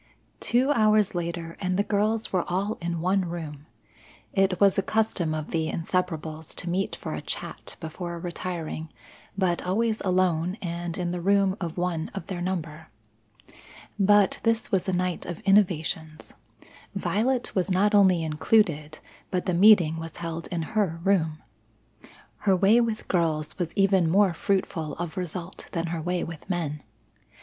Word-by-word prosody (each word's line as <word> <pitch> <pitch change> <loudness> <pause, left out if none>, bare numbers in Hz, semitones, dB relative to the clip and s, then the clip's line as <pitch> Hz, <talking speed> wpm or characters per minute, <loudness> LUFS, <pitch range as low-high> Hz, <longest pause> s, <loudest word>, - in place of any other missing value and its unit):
Two 255 +4 +2
hours 215 -4 +3
later 170 -1 -4
and 185 -1 0
the 200 - +3
girls 215 +2 0
were 180 -2 +2
all 195 +5 -1
in 170 -1 -2
one 190 +2 +2
room. 155 -4 -7 0.7
It 195 -2 +2
was 200 -2 +5
a 195 - +2
custom 190 -6 0
of 155 -1 -5
the 160 -1 0
Inseparables 160 -2 -3
to 180 - -3
meet 190 +2 -1
for - - -6
a - - -4
chat - - -5
before 170 +1 -5
retiring, 170 -2 -5 0.5
but 180 -3 +1
always 220 +4 0
alone 180 -1 +1
and 170 -1 -4
in 175 -2 -1
the 175 -1 -3
room 195 +1 +3
of 170 -1 -4
one 175 -2 -1
of - - -5
their 185 -3 -5
number. 165 -4 -4 1.1
But 205 0 +4
this 230 0 0
was 190 -1 +1
a - - +2
night 180 -1 -1
of 175 -2 -5
innovations; 165 -5 +1 0.6
Violet 245 +4 0
was 185 0 0
not 195 +3 +3
only 190 -5 +5
included, 155 -1 +1 0.3
but 180 -2 -1
the 185 - 0
meeting 175 -4 +6
was 165 -1 -8
held 165 -1 -5
in 170 -2 -3
her 190 -6 +1
room. 165 -6 +1 0.9
Her 195 -2 +2
way 200 +6 +5
with 225 -2 -2
girls 155 -4 0
was 170 -2 -1
even 195 -4 +4
more 195 +1 +4
fruitful 170 -4 -1
of 175 0 -5
result 180 0 -5
than 165 -2 -1
her 165 - -2
way 175 +2 -1
with 165 +2 -8
men. 155 -5 -2
180 Hz, 160 wpm, -26 LUFS, 165-195 Hz, 1.1 s, meeting